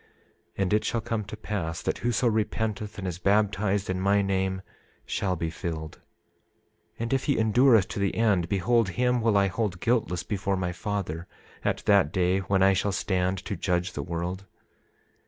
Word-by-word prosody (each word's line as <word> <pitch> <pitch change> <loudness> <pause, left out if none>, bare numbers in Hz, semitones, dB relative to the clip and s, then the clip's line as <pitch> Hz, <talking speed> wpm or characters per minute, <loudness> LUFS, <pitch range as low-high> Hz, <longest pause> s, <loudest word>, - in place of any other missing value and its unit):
27:16 - - -3
And 95 - 0
it 105 - +3
shall 115 - -1
come 110 -1 -2
to 105 - -8
pass, 95 -6 -4
that - - -1
whoso 120 +1 +1
repenteth 110 -1 -1
and 95 -2 -4
is 90 -1 -4
baptized 100 0 +1
in 95 0 -2
my 100 +1 +3
name 95 -1 -1 0.4
shall 95 -2 -1
be 80 -1 -3
filled; 80 -2 -5 1.0
and 115 +2 -2
if 135 - 0
he 145 - +2
endureth 110 -1 +4
to - - -4
the 100 -1 0
end, 100 -7 +2
behold, 115 +2 +2
him 125 +4 +1
will 110 -2 +3
I 100 - +4
hold 100 -1 -2
guiltless 110 -7 0
before 100 -2 -1
my 90 -1 -1
Father 90 -2 -4 0.4
at - - -1
that 100 -7 +4
day 90 +1 +2
when 95 0 +1
I 95 0 +6
shall 100 +1 0
stand 95 -1 0
to 100 - -3
judge 90 0 -1
the 70 - -3
world. 85 +5 -4
100 Hz, 180 wpm, -27 LUFS, 90-110 Hz, 1.0 s, I